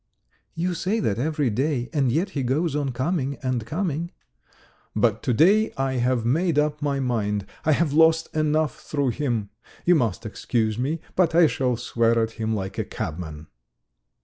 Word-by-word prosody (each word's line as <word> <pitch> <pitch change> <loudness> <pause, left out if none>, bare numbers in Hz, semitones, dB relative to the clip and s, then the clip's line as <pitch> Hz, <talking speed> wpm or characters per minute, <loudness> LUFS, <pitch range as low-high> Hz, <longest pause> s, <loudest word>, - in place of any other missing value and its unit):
"You 175 +2 -1
say 190 +6 -1
that 110 - 0
every 150 -2 0
day, 130 +1 0
and 135 -5 +2
yet 180 +9 0
he 140 - -2
goes 145 +5 0
on 145 -3 -1
coming 135 +2 -1
and 130 -3 -1
coming." 170 +1 -2 0.9
"But 110 0 +2
to 130 - 0
day 200 - +4
I 135 -1 0
have 125 -1 +1
made 160 +6 +1
up 150 0 +1
my 140 -1 0
mind. 105 -6 -1 0.2
I 155 - +4
have 150 -1 +1
lost 160 +1 +4
enough 155 0 +1
through 140 -3 -1
him. 120 -5 -2 0.3
You 180 - +6
must 115 - 0
excuse 110 0 -1
me, 150 +6 -1
but 170 -3 +2
I 170 0 +7
shall 130 -5 0
swear 115 0 +1
at 115 -1 +1
him 110 -1 -2
like 95 -2 -4
a - - +1
cabman." 80 -2 -6
135 Hz, 175 wpm, -24 LUFS, 115-160 Hz, 0.9 s, I